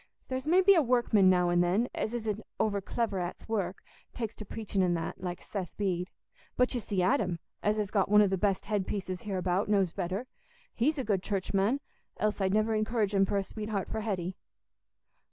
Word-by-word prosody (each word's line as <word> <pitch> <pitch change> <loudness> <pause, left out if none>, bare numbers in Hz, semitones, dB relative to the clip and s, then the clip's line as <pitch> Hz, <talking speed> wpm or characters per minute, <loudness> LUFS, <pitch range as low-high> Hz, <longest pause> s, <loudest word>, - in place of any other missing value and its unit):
There's 260 +2 -3
maybe 375 +4 +6
a 340 - +5
workman 240 -7 +4
now 180 -1 +3
an' 175 0 +4
then, 190 +7 +2
as 225 - -2
isn't 220 -2 -2 0.2
overclever 200 -1 0
at's 175 0 -6
work, 195 -5 -2 0.3
takes 225 -3 -3
to 215 - -7
preachin' 205 -2 -2
an' 180 -2 +2
that, 165 +2 -4
like 180 -1 -4
Seth 190 -5 -5
Bede. 185 -2 -1 0.5
But 250 +1 +3
you 245 - 0
see 195 -4 -1
Adam, 180 -1 +2 0.2
as 210 +1 +1
has 210 -2 -1
got 195 -3 +2
one 210 0 +7
o' - - +3
the 190 - +1
best 195 0 0
head 205 -3 -1
pieces 185 -3 -3
hereabout, 190 -1 -1
knows 195 -5 +2
better; 190 +5 -3 0.5
he's 300 +7 +1
a 265 - -1
good 205 -4 +1
Churchman, 200 +6 0 0.4
else 210 -1 0
I'd 190 -1 +2
never 215 +2 +2
encourage 215 -1 0
him 195 -1 +4
for 200 - 0
a 195 - +1
sweetheart 210 -1 -4
for 220 - -3
Hetty." 190 -4 -2
205 Hz, 195 wpm, -30 LUFS, 185-220 Hz, 0.5 s, one